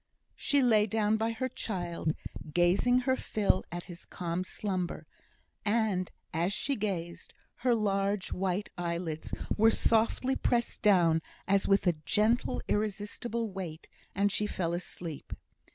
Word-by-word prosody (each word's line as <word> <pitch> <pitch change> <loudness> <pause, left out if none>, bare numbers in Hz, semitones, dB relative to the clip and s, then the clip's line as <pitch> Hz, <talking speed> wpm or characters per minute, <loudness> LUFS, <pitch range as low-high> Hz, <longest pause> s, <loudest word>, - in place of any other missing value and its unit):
She 285 -2 +3
lay 220 -3 +5
down 215 +1 +2
by 225 +1 0
her 230 +3 -2
child, 175 -9 -3 0.4
gazing 180 +10 +4
her 260 +1 +2
fill 205 -6 +1
at 175 0 -4
his 175 -1 -9
calm 175 0 -3
slumber; 185 -2 -3 0.6
and 210 -4 +1 0.2
as 170 +4 +1
she 280 +5 0
gazed, 180 -6 -4 0.2
her 240 0 +2
large 200 -2 0
white 190 +2 -1
eyelids 170 -2 -3 0.2
were 225 +1 +6
softly 230 +4 +2
pressed 235 -1 0
down 175 -6 +5 0.3
as 195 0 +3
with 195 +1 +3
a 175 - +4
gentle 220 +7 +2
irresistible 215 +2 -2
weight, 175 -4 -6 0.3
and 200 +1 +2
she 210 +1 0
fell 170 -4 -2
asleep. 170 -3 -5
200 Hz, 135 wpm, -30 LUFS, 175-220 Hz, 0.6 s, were